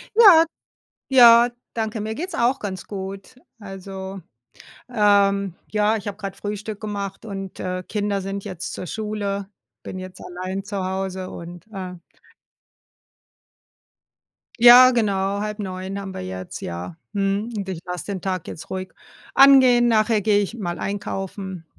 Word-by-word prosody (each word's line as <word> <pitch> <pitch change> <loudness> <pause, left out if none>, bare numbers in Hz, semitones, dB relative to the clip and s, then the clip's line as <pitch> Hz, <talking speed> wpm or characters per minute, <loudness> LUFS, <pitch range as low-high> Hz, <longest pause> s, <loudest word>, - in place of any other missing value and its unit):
Ja. 375 -8 +8 0.7
Ja 240 -2 +8 0.2
danke, 220 -1 -2
mir 220 +1 -3
geht's 345 +5 -5
auch 250 +3 +2
ganz 190 -3 -5
gut. 195 +3 -7 0.2
Also, 195 -1 -8 0.7
ähm, 200 -4 +3
ja, 210 +1 +2
ich 210 -2 -5
habe 200 0 -4
gerade 195 -2 -6
Frühstück 210 +1 -5
gemacht 200 -1 -5
und, 195 -2 -7
äh, 185 0 -3
Kinder 205 -1 -1
sind 195 +1 -5
jetzt 190 -2 -6
zur 180 - -6
Schule, 205 -1 -3 0.4
bin 185 - -6
jetzt 185 0 -9
allein 185 +2 -5
zu 200 -2 -4
Hause 190 0 -3
und, 175 +1 -9
äh 185 -3 -6 2.6
Ja, 245 +2 +10
genau, 200 -4 0
08:30 200 -2 -4
haben 195 -1 -6
wir - - -6
jetzt, 95 0 -7
ja. 85 0 -6 0.2
Mhm, 200 +3 -1
und 200 -2 -4
ich 180 -3 -4
lasse 180 -3 -5
den 195 -3 -4
Tag 185 -3 -3
jetzt - - -8
ruhig 185 0 -5 0.4
angehen, 260 -3 +7
nachher 220 -1 +3
gehe 205 0 +3
ich 205 +3 -4
mal 175 -5 -3
einkaufen. 195 -2 -5
200 Hz, 140 wpm, -22 LUFS, 190-215 Hz, 2.6 s, Ja